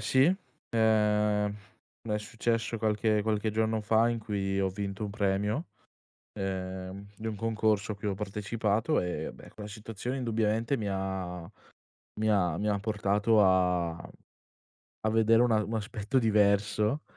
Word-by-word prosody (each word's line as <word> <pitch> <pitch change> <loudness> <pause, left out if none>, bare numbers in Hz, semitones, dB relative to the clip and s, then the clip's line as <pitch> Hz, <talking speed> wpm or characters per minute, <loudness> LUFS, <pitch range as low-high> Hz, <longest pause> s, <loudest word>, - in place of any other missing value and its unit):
sì, 130 +1 +4 0.5
ehm, 105 -2 +2 0.5
è 105 -2 -1
successo 115 0 -1
qualche 105 0 +1
qualche 110 0 0
giorno 110 +1 0
fa 110 +2 +3
in 120 -1 -1
cui 100 -3 -2
ho 95 - +2
vinto 100 +2 -4
un 105 - -4
premio, 105 - 0 0.7
ehm, 95 0 -5
di 110 - -5
un 110 - -3
concorso 110 -1 0
a - - -10
cui 100 +1 -5
ho 100 - 0
partecipato 105 +5 0
e 85 -3 -3
beh, - - -13
quella 105 -1 -9
situazione 110 +4 -5
indubbiamente 115 +1 0
mi 105 -3 -3
ha 95 -2 -3 0.8
mi 110 0 +1
ha 90 -6 +2
mi 105 - -1
ha 105 -1 +1
portato 105 +1 +2
a 90 -2 +3 1.1
a 110 - +1
vedere 115 +1 +4
una 115 -3 +3
un 110 - -5
aspetto 110 +3 -1
diverso, 105 +3 +2
105 Hz, 145 wpm, -29 LUFS, 100-110 Hz, 1.1 s, sì